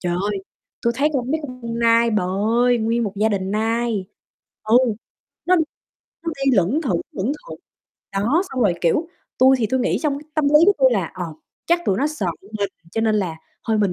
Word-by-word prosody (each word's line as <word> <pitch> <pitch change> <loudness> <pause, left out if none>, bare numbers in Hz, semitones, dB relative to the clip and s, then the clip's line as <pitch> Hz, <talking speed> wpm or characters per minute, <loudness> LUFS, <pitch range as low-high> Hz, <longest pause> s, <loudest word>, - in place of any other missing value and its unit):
Trời 175 -1 -1 0.2
ơi, 200 - -2 0.4
tui 235 - +2
thấy 290 +3 +3
con 260 -1 -1
mấy 315 - 0
con 255 -3 -8
con 230 0 -4
nai 230 0 +4
bà 210 -4 +1 0.4
ơi, 245 -1 +3
nguyên 230 +1 0
một 200 - -3
gia 215 +2 +2
đình 190 -2 -2
nai, 225 -1 0 0.6
ừ, 220 +2 +4 0.7
nó 365 - +5 0.7
nó 330 - -2
đi 275 - +4
lững 200 - +2
thững, 190 - 0
lững 205 +8 -1 0.2
thững. - - -8 0.5
Đó, 230 - +2
xong 260 - -3
rồi, 195 -5 +3
kiểu, 300 - +1 0.3
tui 265 +1 +6
thì 225 - +1
tui 260 +4 0
nghĩ 250 - +1
trong 290 -3 0
cái 295 - -13
tâm 310 - +1
lý 300 +1 +6
của 405 - +7
tui 265 -1 +5
là, 190 -7 -1
ờ, 180 -1 -4 0.4
chắc 345 +1 +3
tụi 190 - +2
nó 285 - +2
sợ 300 -10 -3 0.3
mình, 200 -1 0 0.2
cho 225 - -1
nên 220 -1 +2
là 180 -6 -2 0.3
thôi 220 -1 +2
mình 200 -3 +2
230 Hz, 215 wpm, -21 LUFS, 200-265 Hz, 0.7 s, của